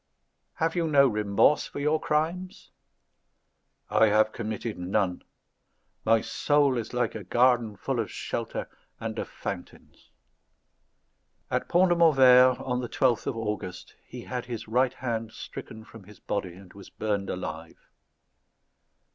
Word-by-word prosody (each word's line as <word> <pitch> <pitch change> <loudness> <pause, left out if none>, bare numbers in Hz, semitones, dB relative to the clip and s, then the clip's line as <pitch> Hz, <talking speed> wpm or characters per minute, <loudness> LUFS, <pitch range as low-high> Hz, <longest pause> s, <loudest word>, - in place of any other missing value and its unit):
"Have 165 +1 -1
you 170 -2 +1
no 140 -3 +5
remorse 105 +4 +2
for - - -7
your 150 +2 +1
crimes?" 165 +5 -2 1.2
"I 110 - +4
have 110 +1 +3
committed 110 -2 -5
none. 90 0 -1 0.8
My 115 0 +4
soul 145 -3 +2
is 115 - -6
like 125 0 -1
a 110 - -6
garden 120 +1 +2
full 95 - -3
of - - -2
shelter - - -4 0.3
and - - -4
of - - -4
fountains." - - -8 1.4
At - - -1
Pont 180 +1 +4
de 175 - +3
Montvert, 130 -6 +6
on 125 -1 -2
the 120 - -5
12th 125 -4 +1
of 120 - -2
August, 105 -5 -5
he - - -8
had 125 -1 -5
his 115 -2 -6
right 125 +3 +2
hand 115 -4 -4
stricken 110 - -9
from 115 -4 -14
his 105 +1 -15
body, 95 -4 -4
and 95 -1 -15
was 100 -1 -13
burned 100 -2 -2
alive. 80 -2 -6
115 Hz, 140 wpm, -27 LUFS, 105-135 Hz, 1.4 s, Montvert